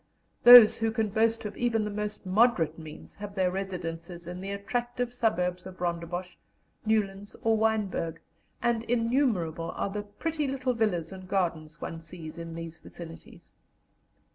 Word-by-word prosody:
Those 240 Hz, -3 st, +11 dB
who 225 Hz, 0 st, +1 dB
can 220 Hz, -1 st, 0 dB
boast 225 Hz, +2 st, +1 dB
of 210 Hz, -, -5 dB
even 235 Hz, -3 st, +1 dB
the 210 Hz, -, -3 dB
most 210 Hz, 0 st, -4 dB
moderate 185 Hz, -6 st, +3 dB
means 155 Hz, -1 st, -10 dB
have 200 Hz, 0 st, -7 dB
their 185 Hz, -2 st, +2 dB
residences 175 Hz, -2 st, -5 dB
in 180 Hz, +1 st, -6 dB
the 195 Hz, -, -5 dB
attractive 240 Hz, +4 st, -3 dB
suburbs 180 Hz, -6 st, 0 dB
of 185 Hz, 0 st, -11 dB
Rondebosch, 175 Hz, +1 st, -3 dB, 0.5 s
Newlands, 205 Hz, -2 st, 0 dB
or 225 Hz, 0 st, +3 dB
Wynberg, 210 Hz, -7 st, 0 dB, 0.5 s
and 235 Hz, -1 st, +2 dB
innumerable 230 Hz, -, +1 dB
are 200 Hz, -, -2 dB
the 210 Hz, +1 st, -3 dB
pretty 295 Hz, +9 st, -3 dB
little 260 Hz, -1 st, -1 dB
villas 195 Hz, -7 st, 0 dB
and 185 Hz, -1 st, -10 dB
gardens 165 Hz, -5 st, -1 dB
one 165 Hz, -1 st, -5 dB
sees 160 Hz, 0 st, -9 dB
in 165 Hz, 0 st, -7 dB
these 165 Hz, -1 st, -7 dB
vicinities. 165 Hz, +1 st, -12 dB
195 Hz, 150 wpm, -28 LUFS, 170-225 Hz, 0.5 s, Those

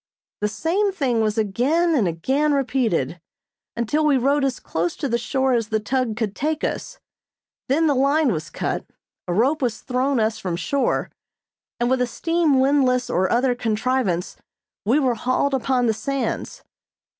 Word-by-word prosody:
The 210 Hz, -, +1 dB
same 330 Hz, -, 0 dB
thing 260 Hz, -11 st, 0 dB
was 215 Hz, 0 st, 0 dB
again 265 Hz, -, +1 dB
and 235 Hz, -, +2 dB
again 265 Hz, -, 0 dB
repeated, 230 Hz, -, 0 dB, 0.6 s
until 235 Hz, +7 st, 0 dB
we 295 Hz, -3 st, +4 dB
rode 280 Hz, +3 st, +2 dB
as 270 Hz, -2 st, -1 dB
close 170 Hz, +2 st, -2 dB
to 280 Hz, -, -3 dB
the 235 Hz, -2 st, 0 dB
shore 265 Hz, +2 st, 0 dB
as 230 Hz, -3 st, +1 dB
the 220 Hz, 0 st, 0 dB
tug 230 Hz, 0 st, -1 dB
could 215 Hz, -4 st, -2 dB
take 310 Hz, +2 st, -2 dB
us, -, -, -3 dB, 0.7 s
then 310 Hz, +5 st, +3 dB
the 295 Hz, -, +3 dB
line 280 Hz, +1 st, +3 dB
was 160 Hz, 0 st, -4 dB
cut, -, -, -3 dB, 0.4 s
a 175 Hz, -, -1 dB
rope 275 Hz, -, +2 dB
was 235 Hz, -4 st, -1 dB
thrown 260 Hz, +1 st, 0 dB
us 220 Hz, 0 st, 0 dB
from 180 Hz, -3 st, -3 dB
shore, 225 Hz, +12 st, -1 dB, 0.7 s
and 240 Hz, -, +1 dB
with 260 Hz, 0 st, +1 dB
a 250 Hz, -, +2 dB
steam 330 Hz, +1 st, +1 dB
windlass 260 Hz, -2 st, +2 dB
or 185 Hz, +1 st, +1 dB
other 250 Hz, +1 st, +2 dB
contrivance, 225 Hz, -5 st, -1 dB, 0.5 s
we 235 Hz, +7 st, +3 dB
were 260 Hz, -5 st, +2 dB
hauled 255 Hz, +4 st, 0 dB
upon 255 Hz, -1 st, +1 dB
the 225 Hz, -, +2 dB
sands. 275 Hz, +4 st, -3 dB
255 Hz, 165 wpm, -22 LUFS, 220-280 Hz, 0.7 s, we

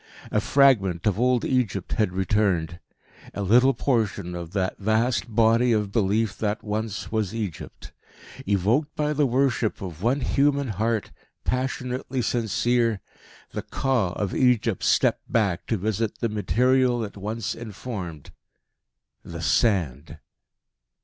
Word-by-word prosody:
A -, -, +2 dB
fragment 105 Hz, -11 st, +3 dB
of 105 Hz, -1 st, +1 dB
old 125 Hz, -1 st, +2 dB
Egypt 115 Hz, -8 st, -1 dB
had 105 Hz, -4 st, +1 dB
returned 90 Hz, -3 st, 0 dB, 0.6 s
a 100 Hz, -, -2 dB
little 125 Hz, +7 st, +4 dB
portion 105 Hz, -8 st, -1 dB
of 85 Hz, -1 st, -6 dB
that 95 Hz, -2 st, -1 dB
vast 110 Hz, +4 st, +1 dB
Body 115 Hz, +2 st, +4 dB
of 105 Hz, -2 st, 0 dB
Belief 105 Hz, 0 st, +1 dB
that 105 Hz, 0 st, -2 dB
once 105 Hz, -1 st, -4 dB
was 110 Hz, -2 st, -1 dB
Egypt. 100 Hz, -9 st, -6 dB, 0.6 s
Evoked 105 Hz, -, +1 dB
by 150 Hz, 0 st, 0 dB
the 145 Hz, -1 st, +2 dB
worship 125 Hz, -3 st, +1 dB
of 90 Hz, -4 st, -7 dB
one 125 Hz, +6 st, +1 dB
human 140 Hz, -1 st, +1 dB
heart, 110 Hz, +2 st, -1 dB, 0.3 s
passionately 125 Hz, 0 st, -2 dB
sincere, 115 Hz, -1 st, +1 dB, 0.5 s
the -, -, -4 dB
Ka 120 Hz, -10 st, -1 dB
of 100 Hz, -3 st, -3 dB
Egypt 120 Hz, -5 st, +2 dB
stepped -, -, +1 dB
back 100 Hz, -6 st, 0 dB
to 110 Hz, -, 0 dB
visit 110 Hz, +2 st, -2 dB
the 115 Hz, -, -1 dB
material 125 Hz, +3 st, +2 dB
it 105 Hz, -, -7 dB
once 105 Hz, 0 st, -3 dB
informed 105 Hz, -, -7 dB, 0.9 s
the 85 Hz, 0 st, -8 dB
Sand. 80 Hz, -, +1 dB
110 Hz, 130 wpm, -25 LUFS, 100-125 Hz, 0.9 s, little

